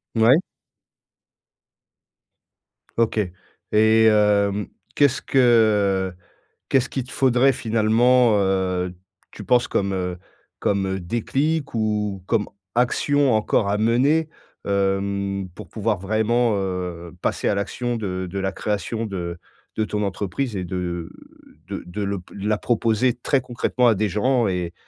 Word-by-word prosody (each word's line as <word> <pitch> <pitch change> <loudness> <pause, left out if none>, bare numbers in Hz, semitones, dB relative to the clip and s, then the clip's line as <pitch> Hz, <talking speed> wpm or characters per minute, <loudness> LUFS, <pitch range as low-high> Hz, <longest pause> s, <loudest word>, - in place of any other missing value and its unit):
Mouais. 115 +5 +6 2.6
OK 115 -1 +2 0.5
et 110 +1 +5
hem, 105 -2 +3 0.3
qu'est-ce 140 -2 +3
que 105 -7 +3 0.6
qu'est-ce 130 -2 +2
qu'il 135 - -3
te 125 - -14
faudrait 130 0 +3
finalement, 115 0 +3
heu, 95 -2 0 0.4
tu - - -9
penses 125 -1 +3
comme, 100 0 -1
heu, 90 -1 -3 0.4
comme, 100 -1 0
heu, 95 0 -2
déclic 135 - -1
ou 105 -3 -1
comme 110 -3 +1 0.3
action 135 +2 +2
encore 110 -1 +1
à 100 - +1
mener, 135 +9 +2 0.4
hem, 100 -1 -1
pour - - -10
pouvoir 110 -1 -1
vraiment, 110 +4 +1
heu, 90 -3 -4
passer - - 0
à 105 - +1
l'action 120 +4 -2
de 95 -4 -3
de 100 - -3
la 95 0 -1
création 110 +3 -2
de 90 -5 -5 0.4
de 110 - 0
ton 105 -1 -2
entreprise 105 +5 -3
et 95 - -2
de 85 -2 -4 0.6
de - - -5
de 90 +4 -6
l'op 100 -2 -4
la 105 +2 -1
proposer 115 +2 +1
très 130 +3 0
concrètement 125 0 0
à 110 - +3
des 105 +2 0
gens 120 +4 +1
et 90 -3 -2
105 Hz, 130 wpm, -22 LUFS, 95-120 Hz, 2.6 s, Mouais